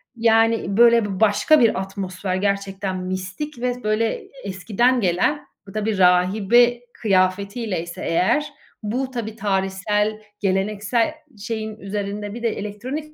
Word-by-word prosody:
yani 225 Hz, -2 st, +2 dB
böyle 235 Hz, -1 st, +6 dB
b 205 Hz, -, -4 dB
b 190 Hz, -, -4 dB
başka 220 Hz, +8 st, +4 dB
bir 230 Hz, -5 st, +3 dB
atmosfer 190 Hz, -1 st, -4 dB
gerçekten 195 Hz, 0 st, -2 dB
mistik 185 Hz, +10 st, -5 dB
ve 250 Hz, 0 st, -2 dB
böyle 215 Hz, +1 st, +1 dB
e -, -, -6 dB
eskiden 215 Hz, +6 st, +1 dB
gelen, 190 Hz, -, +1 dB, 0.2 s
bu 195 Hz, -, -10 dB
tabii, 215 Hz, 0 st, -1 dB
rahibe 200 Hz, +7 st, +4 dB
kıyafetiyleyse 190 Hz, -2 st, -1 dB
eğer 185 Hz, -, +2 dB, 0.4 s
bu 255 Hz, +5 st, -2 dB
tabii, 225 Hz, -3 st, -5 dB
tarihsel, 205 Hz, +1 st, -1 dB, 0.2 s
geleneksel 210 Hz, +4 st, 0 dB, 0.3 s
şeyin 220 Hz, 0 st, -4 dB
üzerinde 205 Hz, 0 st, -4 dB
bir 235 Hz, +1 st, -7 dB
de 230 Hz, -, +2 dB
elektronik 255 Hz, +10 st, -5 dB
210 Hz, 130 wpm, -22 LUFS, 190-230 Hz, 0.4 s, böyle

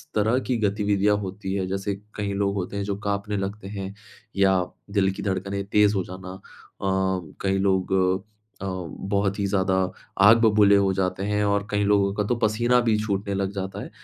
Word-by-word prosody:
तरह 110 Hz, +4 st, +2 dB
की 125 Hz, -, +1 dB
गतिविधियाँ 105 Hz, -1 st, +2 dB
होती 95 Hz, 0 st, -5 dB
हैं? 95 Hz, -2 st, -1 dB
जैसे 95 Hz, +1 st, -2 dB, 0.2 s
कई 100 Hz, -1 st, -2 dB
लोग 100 Hz, 0 st, 0 dB
होते 95 Hz, +1 st, -3 dB
हैं 100 Hz, -, -1 dB
जो 100 Hz, 0 st, -2 dB
काँपने 100 Hz, 0 st, -1 dB
लगते 100 Hz, +1 st, -4 dB
हैं 100 Hz, -1 st, -5 dB, 0.4 s
या 95 Hz, -1 st, +4 dB, 0.3 s
दिल 95 Hz, -2 st, +3 dB
की -, -, -7 dB
धड़कने 100 Hz, 0 st, -2 dB
तेज़ 105 Hz, 0 st, +4 dB
हो 95 Hz, -, 0 dB
जाना, 95 Hz, 0 st, -8 dB
अ, 95 Hz, -, -11 dB, 1.0 s
कई 95 Hz, 0 st, +1 dB
लोग 95 Hz, -1 st, +1 dB, 0.7 s
अ, -, -, -4 dB
बहुत 100 Hz, +2 st, -2 dB
ही 100 Hz, -, +1 dB
ज़्यादा 95 Hz, -1 st, +1 dB, 0.5 s
आग 115 Hz, +2 st, +8 dB
बबूले 105 Hz, -2 st, +5 dB
हो 100 Hz, -1 st, +3 dB
जाते 95 Hz, 0 st, -1 dB
हैं 105 Hz, 0 st, 0 dB
और 100 Hz, 0 st, 0 dB
कई 105 Hz, 0 st, +1 dB
लोगों 100 Hz, -1 st, +3 dB
का 105 Hz, -, 0 dB
तो 120 Hz, -, +1 dB
पसीना 120 Hz, +3 st, +3 dB
भी 115 Hz, -2 st, +2 dB
छूटने 100 Hz, -1 st, -2 dB
लग 95 Hz, 0 st, -1 dB
जाता 95 Hz, -1 st, -4 dB
है। -, -, -8 dB
100 Hz, 190 wpm, -24 LUFS, 95-105 Hz, 1.0 s, आग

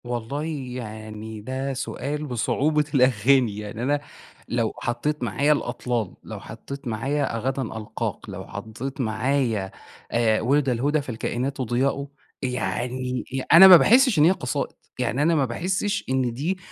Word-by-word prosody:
والله 120 Hz, +4 st, -3 dB, 0.3 s
يعني 110 Hz, -2 st, -7 dB
ده 130 Hz, +4 st, -3 dB
سؤال 145 Hz, +3 st, -4 dB
بصعوبة 150 Hz, +4 st, +1 dB
الأغاني، 125 Hz, -3 st, +3 dB
يعني 105 Hz, +2 st, -6 dB
أنا، 145 Hz, +2 st, +1 dB, 0.5 s
لو 115 Hz, -2 st, 0 dB
حطيت 130 Hz, +5 st, -2 dB
معايا 140 Hz, +7 st, +2 dB
الأطلال، 120 Hz, -6 st, -2 dB
لو -, -, -7 dB
حطيت 140 Hz, -1 st, -9 dB
معايا 135 Hz, +3 st, -1 dB
غدًا 135 Hz, +4 st, -1 dB
ألقاك، 110 Hz, -3 st, -5 dB
لو -, -, -7 dB
حطيت 125 Hz, +5 st, -6 dB
معايا، 115 Hz, -3 st, 0 dB, 0.4 s
آآ، 115 Hz, -2 st, +2 dB
وِلد 135 Hz, +3 st, +2 dB
الهدى 140 Hz, +5 st, +1 dB
فالكائنات 130 Hz, +1 st, -3 dB
ضياء، 135 Hz, +3 st, 0 dB, 0.3 s
يعني 125 Hz, +2 st, -2 dB, 0.3 s
أ -, -, +9 dB
أنا 190 Hz, +2 st, +12 dB
ما 185 Hz, -2 st, +11 dB
باحِسش 245 Hz, -, +5 dB
إن -, -, +6 dB
هي 170 Hz, -, +6 dB
قصائد، 125 Hz, -10 st, -3 dB, 0.2 s
يعني 130 Hz, -, 0 dB
أنا 165 Hz, +2 st, +3 dB
ما 140 Hz, -3 st, +3 dB
باحِسش 190 Hz, -, -1 dB
إن 130 Hz, -2 st, +1 dB
دي، 160 Hz, +10 st, -2 dB
130 Hz, 140 wpm, -24 LUFS, 115-145 Hz, 0.5 s, أنا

